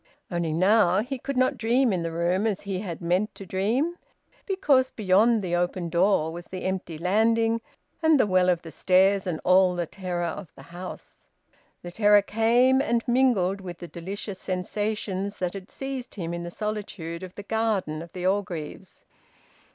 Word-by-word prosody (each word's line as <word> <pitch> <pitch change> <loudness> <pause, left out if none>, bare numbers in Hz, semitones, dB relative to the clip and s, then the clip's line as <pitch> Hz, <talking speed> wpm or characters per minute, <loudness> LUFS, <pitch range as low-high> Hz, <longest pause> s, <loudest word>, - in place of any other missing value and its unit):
Only, 170 -2 -1
now, 185 +2 +4
he 265 +2 -5
could 275 +1 -4
not 255 0 +2
dream 235 +1 +2
in 180 - -1
the 165 0 -3
room 175 +5 +1
as 205 -3 -1
he 195 -2 -3
had 180 -5 -6
meant 180 +5 0
to 195 - -9
dream; 235 - -1 0.5
because 285 -10 +3
beyond 215 +2 +3
the 175 -1 -1
open 175 0 -1
door 170 -2 +2
was 170 +1 -8
the 185 -1 -7
empty 185 -4 -3
landing 225 +6 +2 0.4
and 320 -3 +4
the - - +5
well 185 -2 +3
of 175 -1 +1
the 165 - -9
stairs 190 +2 +3
and 165 -3 -2
all 185 0 +4
the 175 -1 -1
terror 180 0 -4
of 170 0 -5
the 135 - -13
house. 180 +1 -9 0.6
The 175 - -7
terror 205 +1 +5
came 240 +5 +3
and 235 -3 0
mingled 235 -7 +2
with 175 -2 -7
the 175 - -8
delicious 190 +3 -6
sensations 200 +1 -3
that 180 -1 -2
had 195 0 -8
seized 270 -2 -6
him 170 -4 -4
in 170 - -4
the 170 - -5
solitude 200 -5 -5
of 185 -1 -9
the 205 - -8
garden 205 -8 -1
of 170 0 -10
the 180 -1 -5
Orgreaves. 185 -5 -3
190 Hz, 180 wpm, -26 LUFS, 175-225 Hz, 0.6 s, the